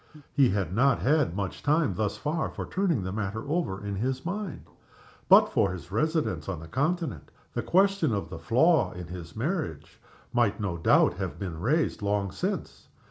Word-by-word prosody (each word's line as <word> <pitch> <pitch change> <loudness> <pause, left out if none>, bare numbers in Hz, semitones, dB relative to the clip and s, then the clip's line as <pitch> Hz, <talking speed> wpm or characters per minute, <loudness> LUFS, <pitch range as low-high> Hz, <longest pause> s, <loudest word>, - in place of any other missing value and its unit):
He 135 -3 +5
had 95 -4 -1
not 125 +4 +4
had 145 - +2
much 100 -2 -4
time 150 - +2
thus 105 +2 -2
far 155 +2 -1
for - - -6
turning 180 - 0
the 95 - -3
matter 110 +4 -3
over 140 - -2
in 100 -1 -3
his 130 +6 -2
mind. 195 -1 -4 0.7
But - - +8
for - - +3
his 90 0 -8
residence 115 - 0
on 90 -4 -3
the 80 - -10
Continent 145 - -2 0.2
the - - -1
question 195 -5 +3
of 100 -2 -3
the 80 - -6
flaw 130 - +3
in 90 0 -7
his 85 -2 -8
marriage 140 - -3 0.3
might 120 -3 +2
no 100 -5 -2
doubt 85 - +4
have - - -4
been 90 -5 -5
raised 150 - +1
long 100 -1 0
since. - - -4
110 Hz, 180 wpm, -28 LUFS, 95-155 Hz, 0.7 s, But